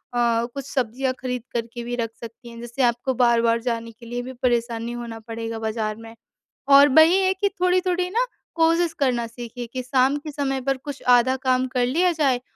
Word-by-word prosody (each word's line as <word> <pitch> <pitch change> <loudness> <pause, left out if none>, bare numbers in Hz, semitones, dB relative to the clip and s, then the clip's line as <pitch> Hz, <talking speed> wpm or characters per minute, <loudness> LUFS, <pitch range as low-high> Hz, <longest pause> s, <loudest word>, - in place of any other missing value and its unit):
कुछ 235 +3 0
सब्जियाँ 255 0 -1
खरीद 250 -2 -4
करके 235 0 -4
भी 245 +1 -4
रख 230 -2 -3
सकती 230 +1 -10
हैं। 230 0 -11
जिससे 240 +3 -5
आपको 240 +2 +1
बार-बार 235 -1 +3
जाने 230 -1 -3
के 230 +1 -16
लिए 240 +1 -4
भी 260 +1 -7
परेशान 235 -2 0
नी 235 - -4
होना 225 -1 -7
पड़ेगा 225 0 -6
बाज़ार 220 -1 -2
में। 225 0 -12 0.5
और 280 +1 +8
बही 315 +6 +6
है 375 0 +2
कि 400 +1 0
थोड़ी-थोड़ी 365 0 +1
ना 470 +5 +1 0.3
कोशिश 330 0 +2
करना 245 -4 +1
सीखिए 240 +1 -8
कि 255 -1 -3
शाम 260 +2 +2
के 300 +1 -7
समय 270 -2 -2
पर 270 +1 0
कुछ 280 +1 -8
आधा 260 +2 +2
काम 255 0 +2
कर 250 -1 0
लिया 345 +8 +2
जाए 275 -6 +1
250 Hz, 195 wpm, -23 LUFS, 235-280 Hz, 0.5 s, और